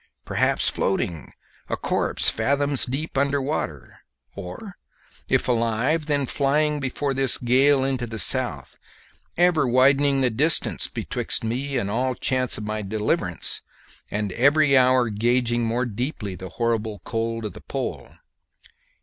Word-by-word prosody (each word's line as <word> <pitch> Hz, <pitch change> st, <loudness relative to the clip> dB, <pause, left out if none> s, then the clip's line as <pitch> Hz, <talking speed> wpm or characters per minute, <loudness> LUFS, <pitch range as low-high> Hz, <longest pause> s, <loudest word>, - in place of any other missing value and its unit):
Perhaps -, -, +1 dB
floating, 85 Hz, -5 st, -2 dB, 0.4 s
a -, -, -2 dB
corpse, -, -, +1 dB
fathoms 140 Hz, -1 st, +1 dB
deep 135 Hz, +2 st, -3 dB
under 140 Hz, 0 st, +1 dB
water, 140 Hz, +3 st, -4 dB, 0.4 s
or, 100 Hz, -, -8 dB, 0.5 s
if -, -, +1 dB
alive, 125 Hz, +6 st, 0 dB
then 145 Hz, -2 st, 0 dB
flying 150 Hz, +3 st, 0 dB
before 135 Hz, +1 st, -2 dB
this 135 Hz, -1 st, +5 dB
gale 130 Hz, +3 st, +3 dB
into 130 Hz, -3 st, -2 dB
the 110 Hz, -1 st, -6 dB
south, -, -, +1 dB, 0.6 s
ever 170 Hz, -5 st, +3 dB
widening 135 Hz, +2 st, +3 dB
the 125 Hz, -2 st, +2 dB
distance 145 Hz, +6 st, +2 dB
betwixt -, -, -2 dB
me 130 Hz, +5 st, -2 dB
and 100 Hz, -4 st, -2 dB
all 125 Hz, +3 st, -1 dB
chance 130 Hz, 0 st, -1 dB
of 110 Hz, -, -6 dB
my 110 Hz, 0 st, -3 dB
deliverance, 105 Hz, +1 st, -1 dB, 0.5 s
and 105 Hz, -1 st, -3 dB
every 140 Hz, +6 st, +3 dB
hour 130 Hz, -2 st, +4 dB
gauging 120 Hz, +2 st, +1 dB
more 120 Hz, +3 st, -1 dB
deeply 120 Hz, -2 st, -4 dB
the 95 Hz, +1 st, -8 dB
horrible 110 Hz, -1 st, -2 dB
cold 115 Hz, -1 st, -3 dB
of 105 Hz, -, -5 dB
the -, -, -12 dB
pole. -, -, -6 dB
125 Hz, 135 wpm, -23 LUFS, 115-140 Hz, 0.6 s, this